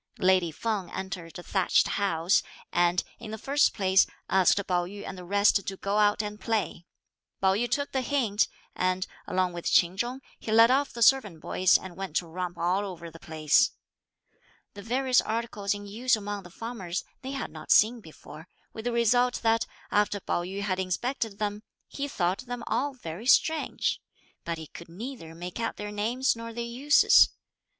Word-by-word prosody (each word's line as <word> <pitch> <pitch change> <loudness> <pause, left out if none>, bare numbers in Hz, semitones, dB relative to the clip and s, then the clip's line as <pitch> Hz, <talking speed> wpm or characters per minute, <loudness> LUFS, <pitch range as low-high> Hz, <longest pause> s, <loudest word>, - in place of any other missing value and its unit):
Lady 185 -2 +3
Feng 200 +1 -3
entered 180 -3 -6
a 175 - -9
thatched 190 0 +2
house, 180 -3 +2 0.3
and, 175 0 +2 0.2
in 230 - -8
the 220 - -5
first 280 +6 +2
place, 190 -1 +3 0.2
asked 190 -1 +4
Pao 180 -1 +1
yü 200 +3 -8
and 190 - -6
the 180 - -9
rest 200 +2 +3
to 195 - -4
go 200 +2 -1
out 210 0 +3
and 210 0 -6
play. 215 -6 -2 0.5
Pao 190 0 +3
yü 240 +5 0
took 285 0 -1
the 265 - 0
hint, 240 -6 +1 0.3
and, 185 0 0 0.2
along 185 -1 0
with 175 -1 -3
Ch'in 175 +1 +4
Chung, 240 +6 -2 0.2
he 220 - -5
led 230 +2 +7
off 275 +2 +2
the 235 - 0
servant 215 -10 +4
boys 185 +3 +3
and 185 -2 -10
went 190 -4 -6
to 175 - +1
romp 175 +1 -5
all 180 +4 +1
over 170 -4 -7
the 165 - -13
place. 155 -3 +2 1.0
The 205 - -9
various 255 +4 +2
articles 215 -3 -2
in 205 0 -8
use 230 +5 +1
among 205 -1 -5
the 175 - -13
farmers 195 -4 -5 0.2
they 265 0 -5
had 275 - -4
not - - -11
seen 230 +3 +5
before, 160 -1 -13 0.3
with 220 - -8
the 245 - 0
result 245 +2 +2
that 225 0 +2 0.2
after 205 0 +2
Pao 175 - -1
yü 190 +3 -5
had 190 -2 -1
inspected 220 +3 -2
them, 210 0 -2 0.3
he 285 0 -4
thought 185 -7 -1
them 245 -1 -5
all 280 0 -1
very 185 0 -7
strange; 315 +4 +2 0.4
but 170 -1 -3
he 160 - -7
could 170 +2 -12
neither 190 -3 -8
make 175 +4 -7
out 230 - -2
their 210 0 -5
names 235 +6 0
nor 230 0 -7
their 235 +1 -3
uses. 255 +5 +5
205 Hz, 185 wpm, -28 LUFS, 180-235 Hz, 1.0 s, led